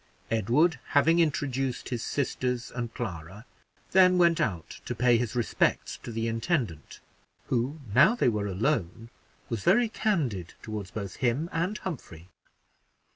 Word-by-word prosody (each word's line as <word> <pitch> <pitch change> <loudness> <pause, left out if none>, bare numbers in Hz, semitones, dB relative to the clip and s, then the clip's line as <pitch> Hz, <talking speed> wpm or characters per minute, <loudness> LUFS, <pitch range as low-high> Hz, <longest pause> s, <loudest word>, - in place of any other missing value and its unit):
Edward, 125 - +2 0.2
having 165 +4 +5
introduced 135 -5 0
his 120 -3 -3
sisters 125 -3 -2
and 120 -2 -4
Clara, 95 -1 -6 0.5
then 185 -1 +6
went 170 -2 +4
out 90 -6 -3
to 125 - -3
pay 120 +1 +4
his 120 -1 -3
respects 120 -3 0
to 120 - -7
the 115 0 -2
intendant, 115 - -2 0.5
who, 130 +5 -1
now 130 - +6
they - - +2
were 105 -3 0
alone, 110 - -1 0.4
was 115 -3 -3
very 230 +5 +4
candid 140 - -1
toward 105 -4 -6
both 100 -4 -5
him 135 +7 0
and 175 +6 -1
Humphrey. 95 - -7
125 Hz, 135 wpm, -28 LUFS, 110-160 Hz, 0.5 s, then